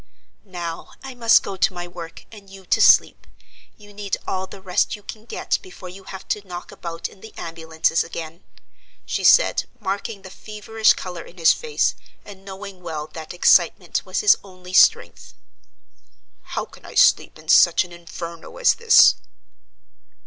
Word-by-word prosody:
"Now 170 Hz, -2 st, -7 dB
I 265 Hz, -1 st, -8 dB
must 230 Hz, -2 st, +4 dB
go 195 Hz, -, -6 dB
to 185 Hz, -, +2 dB
my 175 Hz, 0 st, -6 dB
work, 170 Hz, -1 st, -10 dB
and 205 Hz, -3 st, -14 dB
you 195 Hz, -1 st, -14 dB
to -, -, +1 dB
sleep: -, -, +5 dB, 0.5 s
you 205 Hz, -1 st, -16 dB
need 200 Hz, -1 st, -3 dB
all 190 Hz, 0 st, -3 dB
the 195 Hz, -, -12 dB
rest 185 Hz, -1 st, 0 dB
you 210 Hz, -, -16 dB
can 215 Hz, +1 st, -10 dB
get -, -, -2 dB
before 375 Hz, -, -11 dB
you 190 Hz, +2 st, -13 dB
have 190 Hz, 0 st, -10 dB
to 210 Hz, -, -1 dB
knock 175 Hz, -1 st, -8 dB
about 170 Hz, -1 st, -6 dB
in 190 Hz, -, -19 dB
the 220 Hz, -, -13 dB
ambulances 165 Hz, 0 st, -1 dB
again," 165 Hz, 0 st, -8 dB, 0.6 s
she -, -, -3 dB
said, -, -, +5 dB
marking 200 Hz, 0 st, -4 dB
the 190 Hz, -, -11 dB
feverish 215 Hz, +2 st, 0 dB
color 180 Hz, -2 st, -7 dB
in 175 Hz, -, -15 dB
his 165 Hz, -2 st, +5 dB
face, 465 Hz, -2 st, -1 dB, 0.3 s
and 195 Hz, -2 st, -13 dB
knowing 195 Hz, -1 st, -10 dB
well 160 Hz, -3 st, -5 dB
that 160 Hz, -1 st, -8 dB
excitement 175 Hz, 0 st, +2 dB
was 185 Hz, -1 st, -2 dB
his 210 Hz, -, +6 dB
only 185 Hz, -2 st, -13 dB
strength. -, -, +3 dB, 1.2 s
"How -, -, -1 dB
can -, -, -18 dB
I -, -, -12 dB
sleep -, -, +4 dB
in -, -, -17 dB
such -, -, +5 dB
an 180 Hz, -, -14 dB
Inferno 170 Hz, -, -9 dB
as -, -, +4 dB
this?" 465 Hz, -1 st, +6 dB
190 Hz, 170 wpm, -22 LUFS, 170-205 Hz, 1.2 s, his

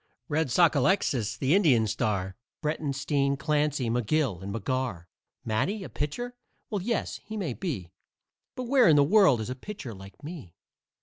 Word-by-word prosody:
Red 155 Hz, +1 st, +1 dB
Sockalexis, 140 Hz, -, +2 dB
the 135 Hz, +3 st, +2 dB
Indian 145 Hz, -, +4 dB
star, 100 Hz, -4 st, -1 dB, 0.3 s
Breitenstein, 140 Hz, -2 st, 0 dB
Clancy, 145 Hz, -2 st, 0 dB
McGill 120 Hz, -, 0 dB
and 100 Hz, +1 st, -5 dB
McGarr. 115 Hz, -4 st, -2 dB, 0.4 s
Matty 190 Hz, -, -1 dB
a -, -, -7 dB
pitcher? 240 Hz, +13 st, -3 dB, 0.4 s
Well, 205 Hz, -3 st, -1 dB
yes, 230 Hz, +5 st, -1 dB
he 220 Hz, -, -6 dB
may 170 Hz, -, -2 dB
be, 115 Hz, -, -4 dB, 0.6 s
But 255 Hz, -, -4 dB
where 250 Hz, 0 st, +4 dB
in 155 Hz, -, +6 dB
the 145 Hz, -, +6 dB
world 175 Hz, -, +5 dB
is 110 Hz, -, -4 dB
a -, -, -3 dB
pitcher 135 Hz, -, -7 dB
like 95 Hz, +6 st, -13 dB
me? 145 Hz, -, -8 dB
140 Hz, 150 wpm, -28 LUFS, 115-175 Hz, 0.6 s, in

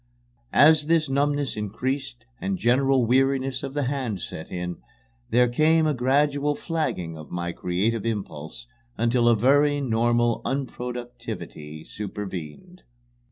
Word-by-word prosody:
As 150 Hz, 0 st, +6 dB
this 165 Hz, -1 st, +3 dB
numbness 145 Hz, 0 st, 0 dB
increased 120 Hz, +4 st, -3 dB
and 195 Hz, -1 st, -2 dB
general 130 Hz, -2 st, +3 dB
weariness 135 Hz, +2 st, +2 dB
of 140 Hz, 0 st, -6 dB
the 145 Hz, -, 0 dB
hand 130 Hz, -6 st, -2 dB
set 80 Hz, -, -7 dB
in, 90 Hz, -1 st, -4 dB, 0.5 s
there 125 Hz, +1 st, +4 dB
came 155 Hz, +6 st, +3 dB
a 155 Hz, -, +2 dB
gradual 145 Hz, +3 st, +2 dB
flagging 145 Hz, -, -2 dB
of 75 Hz, -2 st, -10 dB
my 85 Hz, 0 st, -3 dB
creative 100 Hz, +6 st, -1 dB
impulse 105 Hz, -3 st, -5 dB, 0.3 s
until 120 Hz, +1 st, +3 dB
a 115 Hz, -, +5 dB
very 145 Hz, +5 st, +3 dB
normal 120 Hz, -2 st, +1 dB
unproductivity 120 Hz, -, -5 dB
supervened. 105 Hz, -, -7 dB
125 Hz, 120 wpm, -25 LUFS, 105-140 Hz, 0.5 s, As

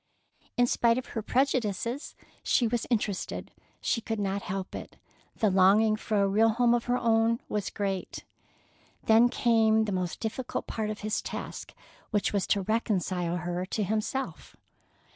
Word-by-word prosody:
In 245 Hz, -, +5 dB
spite 235 Hz, -1 st, +2 dB
of 255 Hz, -, -5 dB
her 225 Hz, -, -3 dB
prejudices, 245 Hz, 0 st, -1 dB, 0.3 s
she 245 Hz, -, +2 dB
was 235 Hz, +1 st, -1 dB
interested. 210 Hz, -5 st, -2 dB, 0.3 s
She 230 Hz, -, 0 dB
could 225 Hz, -1 st, -3 dB
not 200 Hz, 0 st, -1 dB
help 190 Hz, 0 st, -5 dB
it. -, -, -8 dB, 0.4 s
The 215 Hz, -4 st, +2 dB
longing 200 Hz, +4 st, +5 dB
for 215 Hz, -1 st, -1 dB
a -, -, +3 dB
real 215 Hz, +3 st, +4 dB
home 235 Hz, +1 st, +3 dB
of 240 Hz, -1 st, 0 dB
her 245 Hz, 0 st, +1 dB
own 230 Hz, 0 st, +2 dB
was 210 Hz, -2 st, -2 dB
great. 195 Hz, -2 st, -3 dB, 0.8 s
Then 225 Hz, +2 st, +5 dB
came 220 Hz, -3 st, +3 dB
the 210 Hz, -, -3 dB
most 180 Hz, -2 st, -2 dB
difficult 235 Hz, +3 st, -3 dB
part 220 Hz, -1 st, -3 dB
of 215 Hz, -, -5 dB
his 215 Hz, 0 st, -1 dB
task, -, -, -7 dB, 0.3 s
which 210 Hz, -1 st, 0 dB
was 200 Hz, -2 st, 0 dB
to 200 Hz, -, +2 dB
reconcile 185 Hz, -5 st, 0 dB
her 175 Hz, +1 st, -3 dB
to 210 Hz, -, -1 dB
himself. 220 Hz, +6 st, -3 dB
220 Hz, 160 wpm, -28 LUFS, 195-235 Hz, 0.8 s, In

